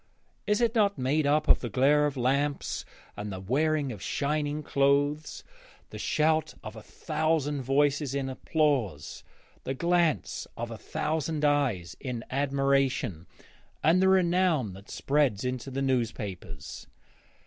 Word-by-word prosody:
Is 210 +2 +2
it 230 -1 +2
not 205 -4 +2
made 140 +3 +1
up 150 +2 +2
of - - +6
the 120 - -4
glare 145 +6 +3
of 145 -2 -5
lamps 140 +3 0 0.3
and 105 0 -5
the 95 - -5
wearing 145 +7 0
of 105 -6 -8
shining 150 - -1
clothes, 145 +2 +1 0.5
the - - -7
shout 155 +1 +1
of 105 +1 -8
a 110 - -9
thousand 155 0 -1
voices 140 +1 +1
in 135 -1 -1
applause, 130 - -1 0.4
the 135 - -3
glance 170 0 0
of 115 0 -4
a 115 - -6
thousand 155 +3 -2
eyes 130 -13 +1
in 125 -3 -5
admiration, 135 - 0 0.6
and 170 +4 +4
the 190 - +4
renown 175 - +2
that 95 +2 -13
spreads 135 -7 +1
into 125 +1 -3
the 135 +1 -2
newspapers? 115 -7 -3
140 Hz, 135 wpm, -28 LUFS, 125-155 Hz, 0.6 s, of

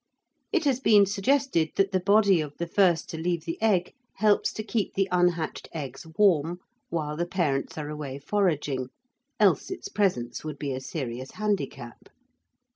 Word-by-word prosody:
It 360 -6 +1
has 265 -3 +2
been 210 -6 +6
suggested 200 - +1
that 195 0 +2
the 190 - +2
body 200 -2 +4
of 145 -1 -7
the 170 - -2
first 175 -1 +2
to 160 - -5
leave 170 -1 -1
the 165 - -5
egg 195 -5 +2 0.2
helps 210 +1 +3
to 215 - -4
keep 215 -2 -2
the 195 0 +2
unhatched 175 -3 0
eggs 140 0 -6
warm 175 -5 +3 0.3
while 150 -3 -2
the 175 +2 -2
parents 155 -8 -1
are 150 -1 -4
away 150 -3 -5
foraging, 145 -7 0 0.5
else 200 -5 +3
its 375 - -6
presence 125 - -1
would 155 -2 -5
be 140 -1 -3
a 130 - -4
serious 130 -2 -5
handicap. 195 - -3
175 Hz, 165 wpm, -27 LUFS, 150-205 Hz, 0.5 s, been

